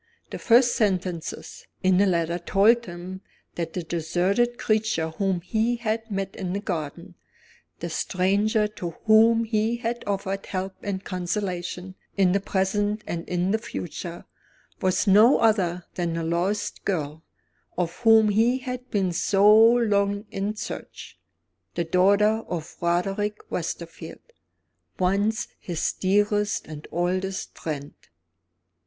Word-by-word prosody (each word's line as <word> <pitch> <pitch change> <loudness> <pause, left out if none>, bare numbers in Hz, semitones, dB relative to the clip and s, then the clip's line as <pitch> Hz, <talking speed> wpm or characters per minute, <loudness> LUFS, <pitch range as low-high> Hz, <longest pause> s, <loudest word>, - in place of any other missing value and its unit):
The - - -5
first 240 +1 +4
sentences 185 -5 -2 0.2
in 185 0 +4
the 200 - +4
letter 170 -1 0
told 215 +7 +3
him 180 +2 -8 0.3
that 165 -1 -4
the 180 - -3
deserted 180 +9 0
creature 215 -7 0
whom 190 +1 -1
he 220 +6 0
had 225 -1 -3
met 195 -2 -3
in 185 -2 -4
the 200 - -1
garden 165 -8 -5 0.7
the 170 - -3
stranger 200 +5 +1
to 175 -5 -7
whom 225 +1 +6
he 220 +1 0
had 235 0 -3
offered 195 -1 -2
help 190 0 -3
and 195 -1 -4
consolation 180 0 -3 0.2
in 190 -2 +4
the 200 - +2
present 205 +2 -1
and 165 -1 -5
in 180 +1 0
the 220 - +1
future 175 -5 -6 0.6
was 185 +2 +1
no 215 +6 +6
other 180 -6 +1
than 170 -2 -2
the 165 0 -2
lost 190 +6 -1
girl 160 -4 -3 0.5
of 175 0 -2
whom 225 -2 +5
he 225 +5 +3
had 250 -1 -6
been 195 -3 0
so 200 +4 +4
long 215 -3 +4
in 200 +2 -2
search; - - -8 0.6
the 170 - 0
daughter 200 +6 +3
of 165 -2 -5
Roderick 195 +5 0
Westerfield, 170 - -6 0.6
once 200 +4 +1
his 170 -3 -2
dearest 205 +2 +1
and 150 -1 -9
oldest 185 +3 -2
friend. 145 -3 -5
195 Hz, 130 wpm, -25 LUFS, 175-215 Hz, 0.7 s, whom